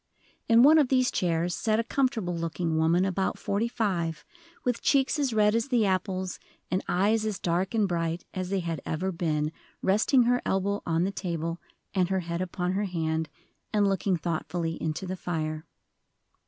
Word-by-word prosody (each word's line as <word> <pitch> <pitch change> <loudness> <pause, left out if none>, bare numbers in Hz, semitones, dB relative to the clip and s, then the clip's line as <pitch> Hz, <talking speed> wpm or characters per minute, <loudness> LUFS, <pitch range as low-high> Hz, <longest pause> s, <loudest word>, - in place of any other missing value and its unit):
In 230 +1 +7
one 310 +3 +8
of 290 - +4
these 255 -1 +2
chairs 170 0 0
sat 215 +2 +1
a - - +2
comfortable 230 -8 0
looking 165 0 -2
woman 165 +3 +3
about 190 0 -1
forty 205 +4 -1
five, 190 -9 -2 0.4
with 245 -2 0
cheeks 275 +2 +2
as 275 -3 +1
red 210 -1 +3
as 230 +2 +1
the 245 -5 +2
apples, 185 -1 -1 0.3
and 185 +1 0
eyes 210 +5 +2
as 215 -3 -2
dark 180 +4 -1
and 215 -3 +3
bright 170 -1 -2
as 185 -1 -3
they 195 -1 0
had 165 -3 -3
ever 185 +5 -2
been, 155 -3 -1 0.3
resting 220 +7 +4
her 245 +1 +2
elbow 200 +1 0
on 165 0 +2
the 195 - 0
table 170 -3 -3 0.3
and 185 -3 +1
her 190 -1 +1
head 170 0 -3
upon 180 0 -2
her 200 +2 0
hand, 160 -3 -1 0.4
and 205 -2 +3
looking 195 -1 +1
thoughtfully 165 0 -3
into 160 +4 -2
the 185 0 -3
fire. 155 -3 -3
185 Hz, 180 wpm, -28 LUFS, 170-215 Hz, 0.4 s, one